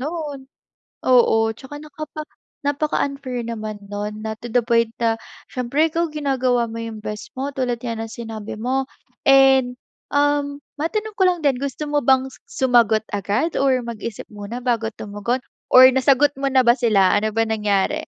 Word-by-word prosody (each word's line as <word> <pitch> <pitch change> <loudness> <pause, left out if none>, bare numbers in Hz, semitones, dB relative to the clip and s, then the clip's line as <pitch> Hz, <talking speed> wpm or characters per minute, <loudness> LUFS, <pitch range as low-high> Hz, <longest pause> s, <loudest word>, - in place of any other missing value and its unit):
'non. 300 -1 -4 0.7
Oo. 225 -3 +4
Tsaka 270 +4 -11
nakapa 305 0 -8 0.4
napaka-unfair 280 -3 -1
naman 215 -2 -5
'non, 210 +1 -4
na 220 0 -3
to 240 - -7
the 245 - +4
point 230 -1 +2
na 230 -1 +2 0.4
siyempre 270 +5 +1
ikaw 335 +2 0
ginagawa 260 -5 0
mo - - -7
yung 225 -1 -6
best 210 -1 -6
mo, 275 +2 -2
tulad 245 -3 -1
nga 230 -1 -3
ng 225 0 -5
sinabi 220 -3 -7
mo. 260 +4 0 0.4
And, 270 -2 +5 0.4
um, 285 0 +1 0.2
matanong 425 +7 -2
ko - - +5
lang 355 -1 +1
din, 280 -3 +3
gusto 280 +2 -4
mo 295 0 +1
bang 265 +1 +3
su - - -16 0.3
sumagot 230 -3 +4
agad 205 - -1
or 265 -2 +3
mag-isip 230 -2 -6
muna 210 +3 -6
bago 230 -3 0
tumugon 210 +5 -3 0.3
or 255 0 +10
nasagot 270 +2 +3
mo 275 - 0
na 260 -1 +4
ba 235 - +7
sila? 200 -6 +4
Ano 215 +1 -1
ba 225 - +3
nangyari? 210 +7 0
250 Hz, 165 wpm, -21 LUFS, 225-280 Hz, 0.7 s, or